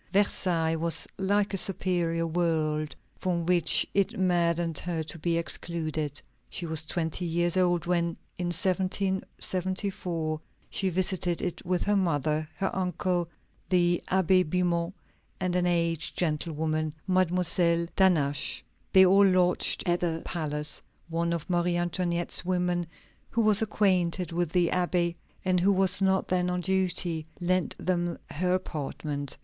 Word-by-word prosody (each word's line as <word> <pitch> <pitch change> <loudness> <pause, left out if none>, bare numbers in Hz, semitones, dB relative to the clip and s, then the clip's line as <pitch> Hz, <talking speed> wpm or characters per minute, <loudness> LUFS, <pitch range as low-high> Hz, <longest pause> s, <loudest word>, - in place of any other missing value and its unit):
Versailles 175 -5 +2
was 165 0 +1
like 200 +1 +1
a - - 0
superior 175 -3 +1
world 155 -2 -1 0.2
from 175 -3 -1
which 175 -1 +4
it 200 -1 +1
maddened 170 -3 +1
her 170 -3 -3
to 160 +2 -8
be 165 +1 0
excluded. 155 -2 -3 0.3
She 175 - -3
was 160 -1 -2
twenty 165 +1 -2
years 175 +1 0
old 175 -3 +2
when, 170 -1 0 0.2
in 180 - -3
1774, 185 -2 -1 0.3
she 195 - 0
visited 180 -1 0
it 180 - -3
with 180 -1 0
her 205 - +1
mother, 155 -4 0
her 195 - -2
uncle, 180 -1 -1 0.4
the 175 -2 +3
Abbé 185 0 +3
Bimont, 175 +1 0 0.5
and 185 -2 -1
an 180 0 +2
aged 170 -2 0
gentlewoman, 155 -1 -1
Mademoiselle 180 -2 +2
d'Hannaches. 150 -7 +2 0.3
They 190 0 +8
all 195 +2 +6
lodged 180 -1 +3
at 175 -1 +1
the 165 -2 -2
palace. 150 -3 -2 0.3
One 170 +1 -1
of 170 -2 -3
Marie 175 -1 +1
Antoinette's 175 0 -1
women, 180 -1 0 0.4
who 230 - +1
was 215 -1 +6
acquainted 185 -5 +1
with 175 -1 -1
the 175 -1 +2
Abbé, 175 -1 0 0.3
and 185 -1 +2
who 190 +3 +3
was 190 0 +2
not 190 0 +2
then 180 -1 +1
on 180 0 -1
duty, 180 -3 +1 0.2
lent 185 0 0
them 175 -2 -1
her 180 +4 +1
apartment. 145 -4 -4
175 Hz, 135 wpm, -28 LUFS, 165-185 Hz, 0.5 s, They